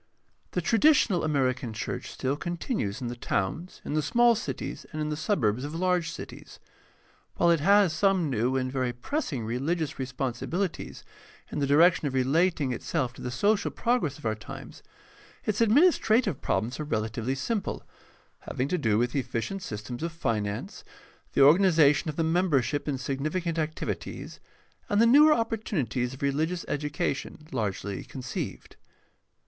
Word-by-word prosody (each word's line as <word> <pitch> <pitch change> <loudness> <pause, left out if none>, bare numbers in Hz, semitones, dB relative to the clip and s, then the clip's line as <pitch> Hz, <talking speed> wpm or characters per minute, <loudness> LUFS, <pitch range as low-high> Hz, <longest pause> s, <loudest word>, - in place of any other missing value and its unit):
— - - -41
The - - 0
traditional 230 - +4
American 130 -6 0
church 110 - -4
still 135 +2 -2
continues 170 - -3
in 125 - -3
the 120 - -4
towns, 120 - -3
in - - -3
the 155 - +2
small 235 +11 +4
cities, 225 - -5
and 155 - -5
in 150 0 -1
the 150 - -1
suburbs 130 - 0
of 150 +2 -5
large 180 -1 +1
cities. 165 - -9 0.8
While 170 - +4
it 165 - +3
has 195 +1 +4
some 185 0 +2
new 125 0 0
and 130 0 -1
very 130 -2 -1
pressing 135 - -3
religious 140 +7 -2
responsibilities 135 +8 -3 0.5
in - - -3
the 140 - +1
direction 160 +3 +5
of 135 - -3
relating 145 +2 +2
itself 120 +1 -2
to - - -12
the 125 - -3
social 205 - +1
progress 230 - 0
of - - -13
our 110 - +1
times, 110 -2 -10 0.6
its 215 +1 0
administrative 230 - +4
problems 120 +6 -1
are - - -1
relatively 115 -1 -2
simple, 205 - -2 0.6
having 130 - -3
to 180 - 0
do 110 -6 +2
with 120 +3 0
efficient 140 +8 -2
sys 105 - -6
tems 120 +2 -6
of 165 +1 -2
finance, 110 -10 -3 0.5
the - - +3
organization 155 -2 +5
of 150 - -4
the 165 - 0
membership 160 -4 +1
in 140 -2 -1
significant 155 +6 -2
activities, 155 0 -4 0.5
and 205 - +2
the 230 - +6
newer 295 +6 +7
opportunities 165 - -1
of 135 - -9
religious 160 +5 0
education, 150 +1 -3
largely 100 - -3
conceived. 130 -2 -6
150 Hz, 155 wpm, -27 LUFS, 125-180 Hz, 0.8 s, newer